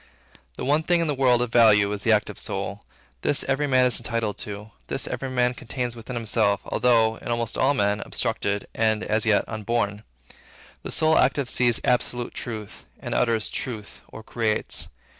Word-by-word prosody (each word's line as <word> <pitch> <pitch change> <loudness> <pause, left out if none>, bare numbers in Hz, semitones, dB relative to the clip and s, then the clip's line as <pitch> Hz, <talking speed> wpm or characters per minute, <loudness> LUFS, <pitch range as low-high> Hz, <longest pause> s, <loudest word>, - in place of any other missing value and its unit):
The - - -5
one 145 +4 +3
thing 175 +2 +2
in 165 - +1
the 150 - 0
world, 125 -3 +3
of 120 - -5
value, 105 -4 +5
is 105 -1 -3
the 115 - +2
active 105 -1 +1
soul. - - -4 0.4
This 145 - +1
every 135 +2 0
man 130 -2 +4
is 125 - +2
entitled 115 -3 -3
to; 105 +1 -6 0.2
this - - -2
every 135 - -4
man 125 -1 +1
contains 125 0 -4
within 120 +2 -8
him, 115 - -5 0.4
although, 115 -2 +2
in - - -11
almost 115 -1 -2
all 140 +2 +2
men, 100 -2 +1
obstructed, 100 0 -1
and 110 -1 +1
as 110 +1 +1
yet 105 -2 +3
unborn. 105 -1 -2 0.8
The - - -7
soul 160 0 +3
active 135 0 +2
sees 120 -2 +3
absolute 120 0 +1
truth; 110 -4 -7 0.2
and - - -5
utters 115 -3 +1
truth, 110 -6 -6
or 110 - -11
creates. 110 -1 -1
115 Hz, 180 wpm, -24 LUFS, 110-125 Hz, 0.8 s, value